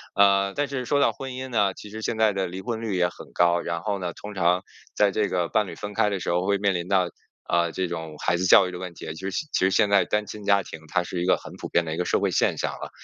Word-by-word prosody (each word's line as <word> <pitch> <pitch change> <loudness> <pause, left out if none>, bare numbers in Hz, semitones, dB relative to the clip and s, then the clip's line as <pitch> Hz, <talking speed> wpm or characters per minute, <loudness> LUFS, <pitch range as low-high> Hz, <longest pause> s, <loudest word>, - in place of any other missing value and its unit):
呃， 100 -1 +4
但 145 0 0
是 135 -2 -3
说 140 +4 +2
到 - - +3
婚 135 -1 -7
姻 130 +1 -6
呢， 100 -5 +2
其 105 - -10
实 110 +2 -7
现 110 - -2
在 110 -2 +3
的 95 -1 -1
离 95 +2 -6
婚 115 +2 -3
率 110 -4 -2
也 90 -1 +3
很 - - -13
高， 85 0 +3
然 85 0 -3
后 100 +1 -2
呢， 90 -2 -3
通 105 +5 -9
常 90 0 +2 0.3
在 105 -1 +4
这 105 +1 0
个 90 -2 0
伴 110 -3 +1
侣 - - -7
分 105 0 -6
开 105 0 +2
的 100 -2 -2
时 - - -4
候 90 +2 +1
会 100 0 +3
面 100 -1 +1
临 85 0 -3
到， 95 -2 +3 0.4
呃， 85 -1 +2
这 95 -1 -1
种 80 -2 -5
孩 85 - +1
子 90 - -1
教 95 +1 +7
育 - - -5
的 90 - -7
问 90 -1 -6
题， - - -10
其 95 +4 -4
实 - - -7 0.2
其 - - +1
实 - - +4
现 105 +1 +3
在 100 -1 +4
单 105 0 0
亲 105 0 -9
家 100 -1 +4
庭 80 - -9
它 90 +1 0
是 90 0 -4
一 - - 0
个 90 - +4
很 - - -11
普 - - -6
遍 85 - +2
的 80 - -3
一 - - -4
个 90 - -1
社 - - +2
会 - - 0
现 - - +2
象 - - -1
了。 - - -7
95 Hz, 335 characters per minute, -25 LUFS, 90-105 Hz, 0.4 s, 教